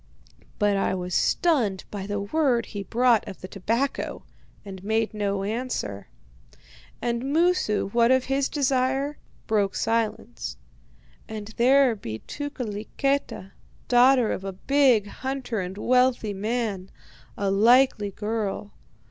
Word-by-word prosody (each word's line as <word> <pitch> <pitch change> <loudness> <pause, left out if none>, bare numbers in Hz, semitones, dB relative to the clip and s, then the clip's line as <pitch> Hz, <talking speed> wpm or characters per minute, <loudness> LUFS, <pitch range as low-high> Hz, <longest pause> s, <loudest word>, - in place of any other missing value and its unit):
"But 205 -2 +2
I 195 - 0
was 180 -1 -4
stunned 235 - +1
by 200 -2 -5
the 205 0 -2
word 245 +2 +1
he 205 - -6
brought 235 +2 +2
of 190 - -8
the 185 - -6
tobacco, 230 +8 -2 0.4
and 190 -2 -9
made 220 +2 0
no 200 -2 -1
answer. 210 - -3 1.0
"And 235 0 -1
Moosu, 305 - +1
what 235 +1 +4
of 260 0 +4
his 270 +1 0
own - - -27
desire, 270 +1 0 0.3
broke 205 -3 +1
silence: 215 - -2 0.7
'And 215 -1 -6
there 260 0 +5
be 110 - -6
Tukeliketa, 250 - -3 0.4
daughter 250 -1 +5
of 190 - -3
a 195 0 -4
big 255 0 +3
hunter 260 0 -4
and 185 +1 -5
wealthy 250 -2 +2
man. 205 -2 -2 0.5
A 200 -1 0
likely 225 +1 +4
girl. 210 0 -3
225 Hz, 125 wpm, -25 LUFS, 200-260 Hz, 1.0 s, there